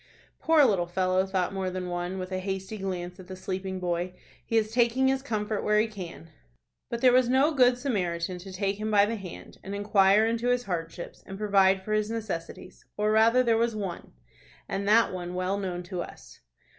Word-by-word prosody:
"Poor 320 -3 +5
little 190 -7 +2
fellow!" 185 +1 +1
thought 190 -1 -1
more 190 -1 -2
than 185 0 -4
one, 175 +1 -3
with 185 0 -5
a 185 - -1
hasty 190 +2 -4
glance 180 -1 -4
at 185 - -11
the 190 - -7
sleeping 190 0 -4
boy. 175 0 -2 0.3
"He 225 - 0
is 215 -1 +1
taking 240 +2 +3
his 265 0 0
comfort 215 -5 -2
where 210 0 +3
he 215 - +3
can." 180 - -9 0.6
But 235 - -4
there 255 -1 +6
was 250 -1 +4
no 270 +5 +4
good 250 -3 +4
Samaritan 180 -9 -2
to 190 +2 -10
take 195 +2 -2
him 215 0 -2
by 205 -1 +5
the 225 +2 -2
hand, 195 -5 -10
and 195 +1 -5
inquire 205 0 +4
into 230 +1 -1
his 245 0 +2
hardships, 170 -4 -5
and 195 - -7
provide 195 -2 +3
for 215 - -3
his 215 0 +1
necessities, 215 -7 -6
or 210 +1 +1
rather 225 +3 +5
there 230 -2 +3
was 230 -1 +1
one, 195 -5 -5 0.5
and 200 +1 -3
that 225 -1 +4
one 180 -1 -5
well 185 +2 -1
known 180 -2 -4
to 180 0 -5
us. - - -11
195 Hz, 205 wpm, -27 LUFS, 185-225 Hz, 0.6 s, there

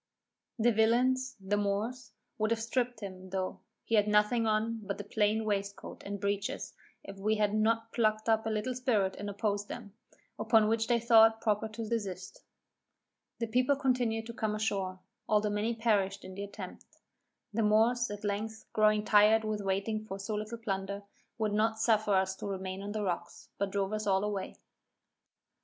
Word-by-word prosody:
The 240 +1 +4
villains, 255 +4 +2
(the 195 +2 -1
Moors), 215 +4 -2 0.3
would 215 0 +1
have 225 -1 0
stripped 245 0 -1
him, 185 -2 -8
though, 185 0 -3 0.2
he - - -5
had 210 -1 +4
nothing 210 +2 +3
on 220 +1 0
but 200 -1 -5
a - - -4
plain 215 +1 +1
waistcoat 200 -1 -3
and 200 0 -5
breeches, 200 0 -2 0.3
if 195 0 -10
we 215 +2 +1
had 210 -1 +1
not 225 +1 +1
plucked 215 -2 +1
up 220 0 +2
a - - +1
little 220 +4 -1
spirit 230 -7 +1
and 205 - -4
opposed 205 0 -1
them; 215 -5 -8 0.5
upon 220 -1 +4
which 225 0 +1
they 240 -1 +3
thought 225 -1 +6
proper 215 0 0
to 220 +1 -6
desist. 195 -5 -4 0.9
The 230 - -1
people 250 +5 +2
continued 245 -5 0
to 235 - -7
come 220 -2 -1
ashore, 195 -3 -2 0.3
though 210 0 +3
many 215 +3 0
perished 200 -4 +1
in 185 - -8
the 200 +2 -5
attempt. 200 - -9 0.7
The 225 - +1
Moors, 225 +3 +3
at 205 0 -7
length, 215 +2 -3
growing 215 0 +3
tired 215 +1 +5
with 215 -1 -2
waiting 200 +3 -1
for 195 - -5
so 195 +2 -4
little 215 +2 -4
plunder, 200 -2 -3 0.3
would 215 -2 0
not 220 +1 +1
suffer 215 -3 +3
us 190 0 +1
to - - -5
remain 190 -1 -4
on 205 +1 -5
the 215 -1 -2
rocks, 175 -2 -4
but 200 - 0
drove 195 +1 -1
us 215 0 -2
all 190 0 +3
away. 205 -2 -3
215 Hz, 180 wpm, -31 LUFS, 200-225 Hz, 0.9 s, thought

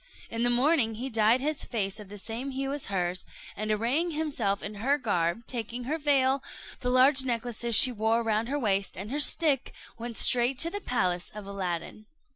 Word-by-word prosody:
In 230 - -3
the 245 - +3
morning 245 -2 +2
he 255 +4 -5
dyed 225 +3 +3
his 300 +2 -1
face 205 -3 -2
of 205 -2 -10
the 205 - -9
same 230 +6 -5
hue 270 +1 -3
as 290 - -2
hers, 180 -2 -1 0.3
and 215 +1 -4
arraying 240 +11 +1
himself 285 -11 -1
in 205 - -4
her 275 +5 +2
garb, 205 - -1
taking 235 0 -5
her 305 +6 -3
veil, 275 -2 +3 0.4
the 250 - -2
large 260 +2 +5
necklace 240 -2 -2
she 255 - +8
wore 225 +1 0
round 225 +1 0
her 285 - -1
waist, 200 -6 0
and 200 +5 -6
her 290 - -1
stick, 295 -3 +1 0.2
went 235 0 -5
straight 245 +1 +3
to 330 +5 +2
the 410 - -4
palace 180 - -1
of 210 -2 -7
Aladdin. 195 +1 -5
235 Hz, 195 wpm, -28 LUFS, 210-270 Hz, 0.4 s, she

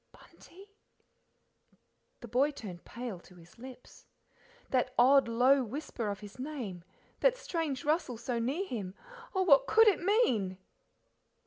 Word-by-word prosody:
"Bunty," 385 +3 -17 1.6
The 240 - -8
boy 255 +6 +2
turned 195 - -9
pale 235 -5 -6
to 180 - -18
his 175 +4 -18
lips. 255 0 -13 0.6
That 255 -1 0
odd, 265 +1 +6
low 255 +4 +4
whisper 240 -2 -5
of 200 0 -5
his 205 +4 -12
name, 250 - -6 0.4
that - - +3
strange 325 - -3
rustle 300 -6 0
so 235 +1 -3
near 275 +12 -1
him 200 - -5 0.4
oh, 375 - +2
what 280 -6 +5
COULD 450 0 +5
it 400 - 0
mean? 255 - +1
255 Hz, 135 wpm, -31 LUFS, 220-300 Hz, 1.6 s, odd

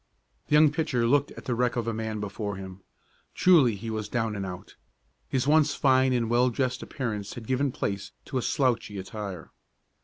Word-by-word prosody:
The - - -2
young 150 -1 +6
pitcher 145 -6 0
looked 140 +4 +3
at - - -11
the 125 - -1
wreck 120 +1 +1
of 120 -2 -1
the 115 - -1
man 110 -1 -3
before 105 0 -4
him. 95 0 -9 0.5
Truly 150 - +5
he 110 +3 -6
was 110 -1 -4
"down 115 -2 -1
and 100 -1 -3
out." 90 0 -9 0.5
His 130 -1 0
once 150 0 +4
fine 130 -1 +3
and 120 -2 +1
well 120 +2 +3
dressed 125 +1 -1
appearance 105 -6 -4
had 115 - -8
given 130 +3 0
place 100 -4 -3
to 130 - -2
a - - -2
slouchy 120 -6 0
attire. 95 -2 -6
120 Hz, 190 wpm, -27 LUFS, 105-130 Hz, 0.5 s, young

